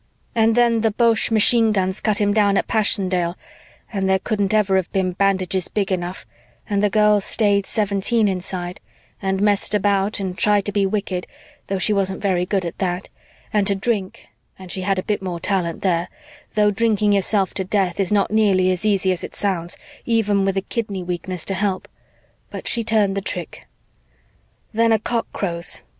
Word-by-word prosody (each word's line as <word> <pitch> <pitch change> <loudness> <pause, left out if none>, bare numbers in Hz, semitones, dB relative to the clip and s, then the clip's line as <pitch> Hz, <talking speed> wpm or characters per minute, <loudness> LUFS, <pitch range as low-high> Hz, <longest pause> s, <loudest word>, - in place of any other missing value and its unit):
"And 225 -1 +3
then 235 -2 +3
the 225 - +3
Boche 225 +1 +2
machine 225 0 +5
guns 190 -1 0
cut 215 -2 +1
him 205 -1 +2
down 205 -2 +3
at - - 0
Passchendaele 185 -5 0 0.6
and 195 -2 0
there 190 - +4
couldn't 200 -1 -1
ever 210 -3 +2
have 185 -2 -2
been 190 -1 0
bandages 190 -1 0
big 200 -2 -2
enough 180 0 -3 0.4
and 200 -1 0
the 210 - +3
girl 210 0 +3
stayed 200 -1 +1
seventeen 210 +2 +1
inside 180 -1 -4 0.4
and 195 0 -1
messed 210 0 +1
about 200 0 +1
and 190 -2 -3
tried 205 0 +2
to 205 - -2
be 200 -1 +1
wicked, 190 -3 -3 0.4
though 195 - -1
she 210 +3 +2
wasn't 190 -1 -1
very 180 -3 0
good 195 -2 0
at 170 - -6
that, 180 -1 -2 0.4
and 205 -2 +2
to 200 - +3
drink, 200 -1 -3 0.3
and 185 -2 -9
she 190 - -3
had 195 +1 0
a 185 - -2
bit 210 -2 -2
more 180 -3 -4
talent 175 -3 -2
there, 175 -2 +1 0.5
though 210 -1 +4
drinking 210 -1 +1
yourself 195 -1 +1
to 190 - -1
death 190 -1 -1
is 195 -1 0
not 205 -1 +2
nearly 195 -4 +3
as 185 +3 -1
easy 195 -2 +2
as 180 - -2
it - - -8
sounds, 180 -4 -2 0.3
even 210 -4 +1
with 195 0 0
a - - +1
kidney 200 -3 -4
weakness 180 0 -4
to 195 - -2
help. 195 -1 -2 0.6
But - - -7
she 235 - +1
turned 215 -3 +1
the 200 - -1
trick. - - -3 1.1
"Then 230 +1 +3
a 220 - +5
cock 230 +2 -2
crows. 170 -3 -3
195 Hz, 185 wpm, -21 LUFS, 185-210 Hz, 1.1 s, machine